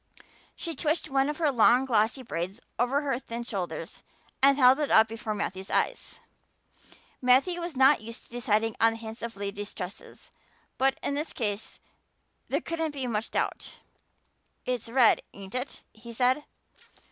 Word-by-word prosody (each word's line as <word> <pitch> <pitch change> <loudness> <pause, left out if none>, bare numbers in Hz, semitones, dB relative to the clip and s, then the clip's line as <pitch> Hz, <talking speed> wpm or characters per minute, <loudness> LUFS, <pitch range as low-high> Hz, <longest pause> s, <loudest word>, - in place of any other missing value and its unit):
She 330 -2 -5
twitched 310 -1 -1
one 270 +1 +2
of 300 - -3
her 310 -4 +2
long 245 +1 +5
glossy 230 +1 +1
braids 185 -1 -4 0.2
over 255 +4 +2
her 270 -4 -1
thin 235 -2 -6
shoulder 195 -7 -4 0.6
and 275 +1 +6
held 260 +1 +6
it 295 - 0
up 220 0 +6
before 220 -1 -4
Matthew's 190 -1 -4
eyes. - - -1 1.0
Matthew 270 +8 +3
was 340 -3 -5
not 265 -2 +5
used 230 +1 -8
to - - -21
deciding 225 -2 +1
on 225 0 +5
the - - -7
tints 225 +1 -8
of 230 -1 -5
ladies' 200 +1 -5
tresses, 185 0 -9 0.5
but 270 +1 +3
in - - 0
this 295 +3 -3
case 210 -3 -3 0.7
there - - 0
couldn't 325 -3 -3
be 270 -2 -2
much 225 -2 -2
doubt. - - -3 0.9
"It's 245 -3 -2
red, 240 -1 +5
ain't 195 0 -10
it?" 255 +2 -3
he 235 +2 -11
said. 255 +5 +2
245 Hz, 160 wpm, -28 LUFS, 220-275 Hz, 1.0 s, and